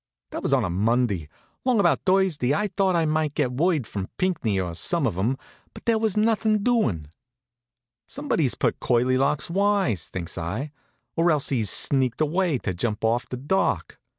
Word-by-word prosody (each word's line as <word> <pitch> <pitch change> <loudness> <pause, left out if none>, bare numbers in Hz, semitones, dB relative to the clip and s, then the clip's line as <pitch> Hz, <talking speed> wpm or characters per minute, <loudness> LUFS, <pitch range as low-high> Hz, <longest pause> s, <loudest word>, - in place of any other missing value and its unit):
That - - -5
was - - -2
on 130 -5 +3
a - - -2
Monday. 100 -4 0 0.3
Long 255 -4 +2
about 170 -8 +3
Thursday 185 -8 +2
I 210 +5 0
thought 190 -1 +1
I 165 -1 +2
might 155 -1 0
get 135 -5 0
word 155 0 +1
from 100 -3 -5
Pinckney, 160 - 0
or 90 -2 -3
some 165 - 0
of 110 -8 -1
'em; 115 +9 0 0.4
but - - -12
there 230 -1 +2
was 220 -2 0
nothin' 215 -1 +2
doin'. 110 - 0 1.0
"Somebody's 260 - -1
put - - 0
Curly 125 +1 +2
Locks 140 +3 0
wise," 195 - +1
thinks 85 -1 -5
I, 105 - -4 0.4
"or 170 +1 +3
else 150 -4 +1
he's 115 -7 +1
sneaked 130 +1 +2
away 160 0 +1
to 100 -5 -3
jump 105 +4 -2
off 115 +3 0
the 125 - -4
dock." 170 +10 -1
140 Hz, 180 wpm, -24 LUFS, 115-185 Hz, 1.0 s, on